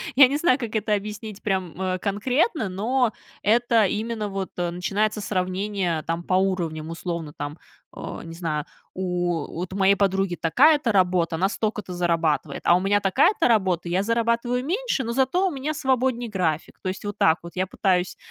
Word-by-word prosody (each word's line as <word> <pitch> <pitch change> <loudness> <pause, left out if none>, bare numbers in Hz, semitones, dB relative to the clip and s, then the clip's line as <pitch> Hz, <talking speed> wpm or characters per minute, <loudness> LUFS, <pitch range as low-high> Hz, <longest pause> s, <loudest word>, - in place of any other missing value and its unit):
Я 270 -1 +9
не 280 - -2
знаю, 285 -4 +3
как 230 -3 -5
это 215 0 0
объяснить, 210 0 -4
прям, 190 -4 -2
э, 185 -1 -1
конкретно. 245 - 0
Но, 225 +5 0 0.3
это 230 0 +4
именно 215 +1 -2
вот, 195 -1 -4
э, 175 -1 -1
начинается 205 +4 -1
сравнение, 185 -3 -1
там, 165 +1 -3
по 185 - -2
уровням, 175 -5 0
условно, 165 -2 -5
там, 145 +2 -5 0.4
э, - - -6
не 165 - -8
знаю. 160 -3 -3 0.3
У 175 -3 -1
вот, 175 +2 -5
у - - -5
моей 195 +1 +5
подруги 195 -2 +1
такая-то 275 - +4
работа, 180 -4 +2
она 190 +4 +1
столько-то 210 -2 -3
зарабатывает, 165 -4 0
а 175 - +6
у 180 - +3
меня 200 +2 +2
такая-то 205 - +3
работа, 190 -7 +1
я 180 +3 +1
зарабатываю 235 +2 0
меньше, 405 - -1
но 235 0 -3
зато 270 +9 +2
у 365 - -2
меня 285 +2 -3
свободней 255 -4 0
график. 165 -6 -2
То 185 - -2
есть, 190 +3 -6
вот 205 - -3
так 160 +1 +4
вот, 170 - -8
я 185 +1 0
пытаюсь, 185 -2 0
195 Hz, 180 wpm, -24 LUFS, 175-230 Hz, 0.4 s, Я